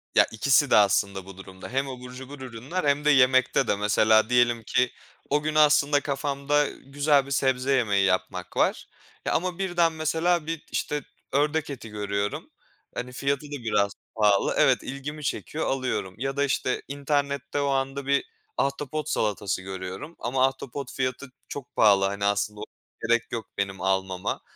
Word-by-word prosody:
Ya, - - +7
ikisi 135 +4 +3
de - - +7
aslında 100 -1 +3
bu 95 -1 -11
durumda. 95 -1 -10
Hem 135 +2 -1
abur 125 -1 -8
cubur 130 +2 -9
ürünler 130 +9 -4
hem 145 +1 +1
de - - +5
yemekte 130 -2 +4
de. - - +2
Mesela, 110 +2 +3
diyelim 120 -2 +3
ki 125 +2 +1 0.4
o 145 +1 +2
gün 155 0 -2
aslında 150 -1 +5
kafamda 140 +1 0
güzel 140 0 +1
bir 140 - -9
sebze 130 -1 +1
yemeği 105 -7 +3
yapmak 95 -1 -1
var, - - +1 0.4
eee, - - +1
ama 180 0 0
birden, 175 -3 +2
mesela, 160 +1 +1
bir, 165 -1 -4
işte, 150 -1 -2 0.3
ördek 150 +2 +1
eti 125 -5 -7
görüyorum. 100 -1 -3 0.5
Hani, 125 +1 -4
fiyatı 140 +1 -1
da 145 -4 -7
biraz 100 -3 +1 0.2
pahalı, 105 -2 +3
evet, - - +4
ilgimi 145 +3 -6
çekiyor, 155 +2 -3
alıyorum. 130 -8 -2
Ya 135 +3 -3
da 140 - +3
işte, 130 -2 0
internette 140 0 -1
o 140 - 0
anda 135 0 -1
bir 140 0 +2 0.3
ahtapot 145 +2 -2
salatası 100 -3 -1
görüyorum 95 - -7
ama 130 +2 +2
ahtapot 135 -1 -6
fiyatı 130 0 -3 0.2
çok 140 -3 -8
pahalı. 100 -3 +5
Hani, 100 +1 -2
aslında 100 +1 0
o 105 - -5 0.4
gerek 120 0 +1
yok 115 -1 -3
benim 100 -1 -2
almama, 95 -1 -1
130 Hz, 165 wpm, -26 LUFS, 105-145 Hz, 0.5 s, Ya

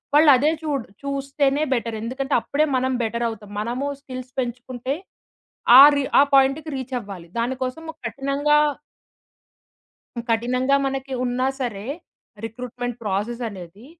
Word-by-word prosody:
వాళ్ళదే 295 -1 +6
చూడరు 280 -9 -3
చూస్తేనే 275 +1 0
బెటర్. 230 -2 -2
ఎందుకంటే 265 +4 -3
అప్పుడే 300 +2 +1
మనం 260 +1 0
బెటరవుతాం. 225 -2 -3
మనము 245 +5 -2 0.2
స్కిల్స్ 255 -2 -8
పెంచుకుంటే 250 +1 -3 0.9
ఆ - - +13
రి 285 - +1 0.2
ఆ - - +8
పాయింట్‌కి 275 +4 +3
రీచవ్వాలి. 235 -9 -6
దాని 240 +3 0
కోసము 320 +6 -4
కఠినంగా 275 +4 +1 1.7
కఠినంగా 250 +4 +2
మనకి 270 0 -3
ఉన్నా 250 +1 0
సరే 215 -4 -3 0.6
రిక్రూట్‌మెంట్ 245 +1 -5
ప్రాసెసనేది 205 -1 -4
255 Hz, 105 wpm, -23 LUFS, 230-275 Hz, 1.7 s, ఆ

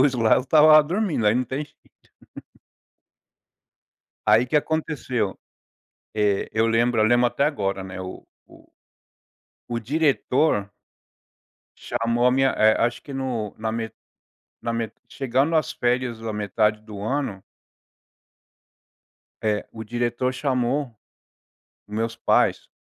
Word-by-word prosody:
luz 135 -1 +4
lá, 115 -2 +4
eu - - +2
estava 155 +3 +7
dormindo, 170 - -1
aí 105 - +4
não 125 +1 +1
tem 130 +5 -4
jeito. 145 - -25 2.5
Aí 110 +3 +6
o - - -13
que 150 - +2
aconteceu, 145 -8 -1 0.9
eh, 105 -2 +1
eu 110 +1 +2
lembro 115 0 +2
eu - - +4
lembro 120 +1 +4
até 140 - -1
agora, 100 -10 -1
né, 95 0 -8
o 95 0 -8 0.3
o - - -18 1.1
o 115 - 0
diretor 135 -4 +1 1.1
chamou 115 +1 0
a - - +5
minha, 135 +1 +3
eh, 110 -2 +4
acho 120 0 0
que 140 - -10
no 125 -6 -3
na 110 0 -2
me 115 -1 -4 0.7
na 115 - -2
me 115 -1 -2 0.2
chegando 135 +4 0
as 155 -4 +1
férias 120 -1 -1
da 115 -1 -4
metade 105 +1 0
do 105 -2 -9
ano 110 -4 -2 2.0
é, 105 -1 0
o 110 - -7
diretor 120 +2 -1
chamou 130 -1 -1 0.9
meus 115 +2 -3
pais 115 - +1
120 Hz, 130 wpm, -23 LUFS, 110-135 Hz, 2.5 s, estava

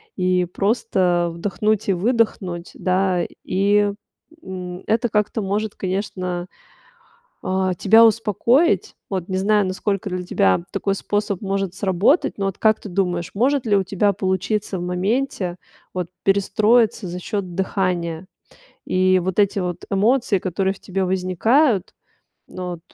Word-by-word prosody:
И 180 -1 +1
просто 180 -3 +1
вдохнуть 205 +4 -1
и - - +4
выдохнуть, 190 -4 -1
да. 185 -1 +1 0.2
И, 200 +2 +2 0.5
м, 180 -1 -7
это 235 +2 +1
как-то 210 +1 0
может, 205 +2 -2
конечно, 185 -2 -3 1.0
а, 190 0 0
тебя 220 +6 +6
успокоить. 230 - +2
Вот 185 -3 -3
не 190 - -3
знаю, 205 +1 +2
насколько 195 +2 -2
для 180 -1 -3
тебя 95 - +2
такой 195 -1 -1
способ 205 -1 -2
может 195 -2 -2
сработать. 195 - +2
Но 200 - -1
вот 195 -2 -2
как 220 -1 +3
ты - - -9
думаешь, 175 -2 -1
может 260 +5 +1
ли 210 -3 +3
у 195 - +3
тебя 200 +2 +1
получиться 190 +1 -1
в - - -5
моменте, 185 +1 -1 0.4
вот, 180 -2 -3 0.2
перестроиться 215 +3 +3
за 175 +1 -5
счёт 185 -1 -4
дыхания? 185 -3 -1 0.6
И 185 0 +3
вот 185 +2 -3
эти 200 0 +2
вот 180 -2 -3
эмоции, 210 +1 +2
которые 190 +1 -1
в - - -18
тебе 190 0 -2
возникают, 190 - +2 0.6
ну 180 -1 -6
вот, 170 - -8
195 Hz, 140 wpm, -21 LUFS, 180-210 Hz, 1.0 s, тебя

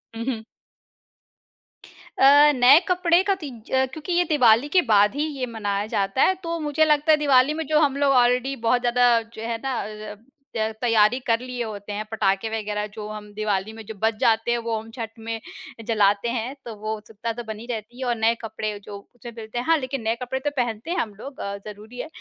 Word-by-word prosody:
हुँ, 230 - -4
हुँ। 240 -4 -3 1.8
अ, 290 +2 +7
नए 255 +4 +7
कपड़े 360 -1 +3
का 395 0 +1
तीज 245 -7 -9
अ, 265 0 +3
क्योंकि 300 +7 -6
ये 350 +1 +3
दिवाली 250 -4 +5
के - - +8
बाद 205 +3 +5
ही 295 +1 0
ये 255 - 0
मनाया 205 -4 -2
जाता 195 +4 +1
है। 375 - +3
तो 335 0 -3
मुझे 305 0 +2
लगता 300 +1 +3
है 310 - +6
दिवाली 280 -1 +4
में 320 +1 -4
जो 305 +1 +3
हम 280 -3 +2
लोग 280 -1 +3
ऑलरेडी 250 +2 +3
बहुत 245 +1 +3
ज़्यादा 240 -1 +3
जो 220 - -8
है 230 -1 -2
ना 265 -3 -1
अ - - -5 0.3
अब, 210 +2 -14 0.3
त 220 - +1 0.2
तैयारी 230 0 +3
कर 230 -1 +3
लिए 250 -1 -5
होते 205 -2 -7
हैं, 210 +1 -4
पटाखे 195 0 0
वग़ैरह 210 -1 -3
जो 210 -1 -7
हम 215 -1 -7
दिवाली 210 0 -2
में 225 0 -10
जो 220 - -7
बज 225 +1 +3
जाते 225 +1 +2
हैं 240 - +2
वो 230 -1 -2
हम, 220 +1 -11
छठ 225 -2 -5
में 225 0 -4 0.5
जलाते 210 0 +2
हैं 240 +3 -3
तो 235 - -6
वो 215 +1 -4
उत्सुकता 215 +2 -6
तो 240 +1 -7
बनी 220 +1 -6
रहती 230 +2 -7
है 260 - -3
और 240 - +1
नए 225 +1 +3
कपड़े 215 -2 -4
जो 200 0 -8
कुछ 245 +4 -16
मिलते 220 +1 -7
हैं 240 - -2
हाँ, 330 0 +4
लेकिन 265 -2 -4
नए 225 +1 0
कपड़े 255 +1 -3
तो 290 - -1
पहनते 240 +4 -2
हैं 360 - -1
हम 225 - -2
लोग 265 +7 -10
अ, 200 0 -4
ज़रूरी 215 +3 -10
है। 300 - -4
235 Hz, 225 wpm, -24 LUFS, 215-270 Hz, 1.8 s, के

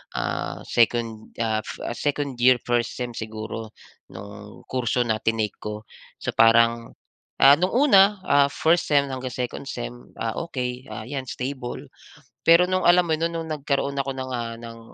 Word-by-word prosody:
ah, - - -3
second, 115 -2 0
ah, 110 -2 0
f - - -8 0.2
2nd 140 -3 -2
year 130 +1 +6
1st 120 -1 0
sem 125 -1 -4
siguro 110 0 -7 0.3
no'ng 105 +2 -11
kurso 125 -1 +1
na 110 -2 -1
tinake 115 -2 -1
ko. 105 0 -6 0.3
So - - -4
parang 115 +1 +4 0.5
ah, 140 +1 +9
no'ng 185 +5 0
una, 245 -8 +7 0.2
ah, 140 0 +4
first 160 +4 +1
sem 145 -2 +4
hanggang 130 -1 -5
second 125 -2 -4
sem, - - -5 0.2
ah, 115 -1 -3
okey 125 -3 -4 0.2
'yan, 135 -2 -4
stable. 130 +1 -5 0.6
Pero 170 +2 +7
no'ng 185 0 0
alam 175 +1 +6
mo 165 - -1
no'n, 165 +2 0
no'ng 165 -1 -4
nagkaroon 140 0 -1
ako 135 0 -2
ng, 130 0 -5
ah, 115 -2 -3
ng, 115 0 -9
125 Hz, 160 wpm, -24 LUFS, 115-140 Hz, 0.6 s, ah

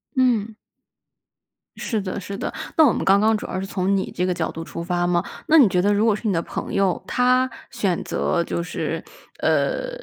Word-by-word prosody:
嗯。 225 -5 +2 1.2
是 220 -4 -2
的 190 +1 -4
是 200 +2 -6
的， - - -4 0.2
那 315 - +8
我 250 - +5
们 - - -2
刚 195 +1 +5
刚 220 +1 +3
主 - - -7
要 185 - -3
是 195 - -3
从 195 0 0
你 190 - -2
这 180 - -1
个 185 - +1
角 160 -2 -2
度 165 - -6
出 170 +1 -6
发 175 0 0
嘛， 175 -1 +1 0.2
那 320 - +6
你 260 -8 +8
觉 180 0 +2
得 205 +2 +3
如 210 +2 +2
果 220 - +4
是 220 - -4
你 200 - +2
的 165 - +1
朋 - - -6
友， 195 -2 +1
他 255 +1 +2 0.2
选 200 -9 -1
择 170 -2 0
就 170 - -3
是， 175 - -4 0.4
呃， - - +1
200 Hz, 235 characters per minute, -22 LUFS, 180-230 Hz, 1.2 s, 那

